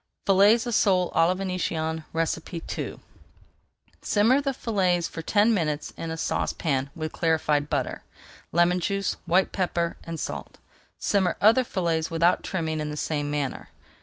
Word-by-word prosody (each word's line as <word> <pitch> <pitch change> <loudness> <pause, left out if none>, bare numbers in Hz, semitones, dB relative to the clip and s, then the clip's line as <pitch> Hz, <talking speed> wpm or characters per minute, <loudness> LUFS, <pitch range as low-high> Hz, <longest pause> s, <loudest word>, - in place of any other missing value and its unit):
FILLETS 205 +5 +5
OF 240 - -2
SOLE 185 -4 +3
À 165 - +4
LA 180 - +1
VÉNITIENNE 165 -4 -2 0.9
II - - -19 1.0
Simmer 230 +7 +3
the 275 -1 0
fillets 185 -9 0
for 165 - -7
ten 210 +7 +3
minutes 150 -6 -1
in 165 - -5
a 160 - -4
saucepan 140 -4 -1
with 155 -2 -4
clarified 150 -3 +1
butter, 140 -4 -2 0.5
lemon 175 +2 +3
juice, 195 +2 -1
white 185 +3 +3
pepper, 175 -3 -1
and 165 -1 -6
salt. - - -6 0.4
Simmer 190 -3 +1
other 225 +5 +5
fillets 170 -7 -1
without 170 +2 +2
trimming 160 -4 -2
in 150 0 -3
the 150 - -5
same 145 -1 -2
manner. 145 -2 -3
170 Hz, 145 wpm, -26 LUFS, 160-195 Hz, 1.0 s, FILLETS